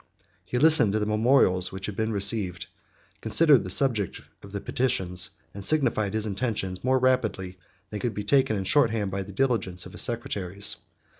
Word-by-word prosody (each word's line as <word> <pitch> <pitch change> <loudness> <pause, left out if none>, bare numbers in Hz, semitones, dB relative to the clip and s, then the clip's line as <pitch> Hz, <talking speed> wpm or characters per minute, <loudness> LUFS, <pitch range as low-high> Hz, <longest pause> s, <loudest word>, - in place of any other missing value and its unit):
He 125 - -4
listened 150 -7 +4
to 110 - 0
the 105 - -1
memorials 105 -4 +2
which 95 0 -7
had 105 - -6
been 110 +2 -2
received, 100 -3 0 0.6
considered 130 +3 +4
the 90 - -7
subject 105 -2 -1 0.2
of 100 - -13
the 100 - -5
petitions, 95 -8 +1 0.2
and 100 - -9
signified 110 -7 +1
his 110 0 -2
intentions 100 -3 -4
more 130 +1 +2
rapidly 125 -7 0
than 90 - -24 0.3
they 105 - -5
could 120 0 -3
be 105 - -4
taken 135 +1 +2
in 95 - -3
short 130 +5 +3
hand 105 -3 -3
by 100 0 -3
the 95 +1 -9
diligence 100 -6 -1
of 90 - -11
his - - -4
secretaries. 100 -5 0
105 Hz, 190 wpm, -25 LUFS, 95-125 Hz, 0.6 s, listened